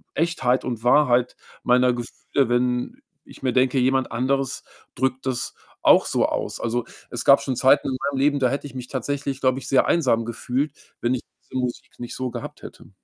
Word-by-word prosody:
Echtheit 130 -6 +1
und 115 -3 -4
Wahrheit 125 -1 +3 0.3
meiner 125 0 +3
Gefühle, 120 +2 -2
wenn 125 - 0 0.3
ich - - -15
mir 125 -2 +1
denke, 130 +1 +2
jemand 130 +1 +2
anderes 130 +3 -1 0.3
drückt 130 +1 -1
das 125 -2 -2 0.3
auch - - +6
so - - +2
aus. - - -3
Also, 115 +1 -1 0.3
es 120 0 -3
gab 140 - +7
schon 130 - -2
Zeiten 135 +4 +4
in 130 - -2
meinem 135 - -4
Leben, 145 +1 +2
da 130 -2 +3
hätte 140 +1 -3
ich 140 - -9
mich 125 -1 -7
tatsächlich, 140 +1 -3
glaube 130 0 +1
ich, 130 - -9
sehr 135 - +4
einsam 125 -8 +2
gefühlt, 125 +5 -2 0.3
wenn 120 +2 0
ich 125 - -2 0.2
diese 130 - -5
Musik 125 -1 -5
nicht 120 - -6
so 130 -1 -3
gehabt - - -8
hätte. - - -11
130 Hz, 195 wpm, -23 LUFS, 125-135 Hz, 0.3 s, gab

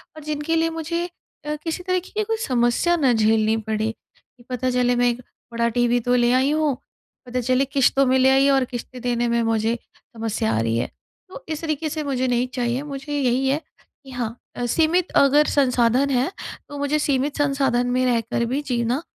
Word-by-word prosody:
और 310 - -10
जिनके 305 +2 -2
लिए 330 0 +2
मुझे 330 +1 -3 0.4
अ, 300 0 -2
किसी 335 +2 -3
तरीके 365 0 -1
की 430 - +2
कोई 450 +1 -2
समस्या 245 +7 +2
ना 270 -6 +3
झेलनी 220 0 +3
पड़े 220 0 0 0.3
कि 240 - -25
पता 255 0 -1
चले 245 0 +2
मैं 245 0 +3
एक 240 +1 -3 0.3
बड़ा 235 0 0
टीवी 240 +1 +2
तो 250 - +4
ले 240 0 +3
आई 260 +3 +3
हूँ 305 -3 +1 0.5
पता 250 +1 -2
चले 255 +2 +2
किश्तों 275 0 +3
में 260 +1 +3
ले 260 +1 +5
आई 270 +1 +4
और 270 -2 +3
किश्तें 245 0 -8
देने 240 -1 0
में 235 0 +1
मुझे 225 +1 +1 0.2
समस्या 225 -1 -3
आ - - +1
रही 115 0 0
है। - - 0 0.4
तो - - -10
इस 315 0 -3
तरीके 310 -1 -2
से 305 +1 -3
मुझे 260 -3 -1
नहीं 245 0 +1
चाहिए 245 +1 -1
मुझे 280 0 -6
यही 260 0 +1
है 275 +2 +2 0.5
कि 270 - -12
हाँ, 235 -2 -3 0.2
अ, 245 - -2
सीमित 325 +7 +1
अगर 285 +2 +5
संसाधन 255 -1 +2
है 260 +6 +1 0.4
तो 290 - -7
मुझे 285 +2 0
सीमित 285 0 0
संसाधन 275 -4 +1
में 255 +1 +1
रहकर 235 -1 0
भी 265 +5 -1
जीना 240 +3 0
255 Hz, 200 wpm, -22 LUFS, 240-290 Hz, 0.5 s, ले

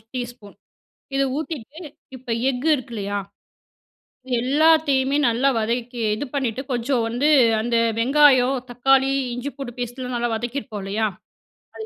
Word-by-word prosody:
ஸ் 215 - -31
டீஸ்பூன். 240 -4 -7 0.6
இதை 275 - +2
ஊத்திட்டு, 310 -2 -6 0.4
இப்போ 250 -2 -8 0.2
எஃக்கு 265 +5 -1
இருக்குல்லையா, 215 -7 -4 1.2
எல்லாத்தையுமே 285 0 +3
நல்லா 240 +4 +2
வதக்கி 235 +2 -2
இது 285 - -4
பண்ணிட்டு, 265 -2 -1
கொஞ்சம் 240 0 0
வந்து 250 +6 0 0.3
அந்த 235 +1 0 0.2
வெங்காயம், 270 0 +5
தக்காளி, 270 +2 +3 0.2
இஞ்சி 250 +4 -4
பூடு 270 -3 -6
பேஸ்ட்டுலாம் 245 +1 -4
நல்லா 240 0 -1
வதக்கிருப்போம் 225 -3 -5
இல்லையா, 215 +3 -1 0.7
அது 440 - -7
250 Hz, 120 wpm, -22 LUFS, 235-275 Hz, 1.2 s, வெங்காயம்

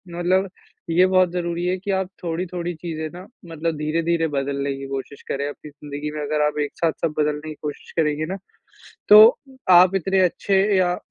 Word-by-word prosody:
मतलब 185 +2 +1 0.4
ये 175 +3 +4
बहुत 185 -1 +3
ज़रूरी 175 -1 -3
है 180 +1 0
कि 195 +2 -4
आप 190 -1 -1
थोड़ी-थोड़ी 175 +1 -3
चीज़ें 160 -1 -5
ना 180 +2 -10 0.2
मतलब 165 0 -3
धीरे-धीरे 165 +2 0
बदलने 140 -1 -2
की 135 0 -7
कोशिश 135 +1 -6
करें 140 +1 -2
अपनी 145 +1 -9
ज़िन्दगी 145 +1 -7
में। 150 - -4
अगर 150 +1 -1
आप 150 - -3
एक 145 - -5
साथ 165 -1 +1
सब 165 -2 0
बदलने 150 +1 -1
की 155 - -7
कोशिश 150 -1 -7
करेंगे 155 -1 +1
ना - - -4 0.7
तो 210 +1 +10 0.6
आप 185 +1 +4
इतने 190 +1 +1
अच्छे 190 +2 +2 0.2
या 180 -1 +2
165 Hz, 185 wpm, -22 LUFS, 150-180 Hz, 0.7 s, तो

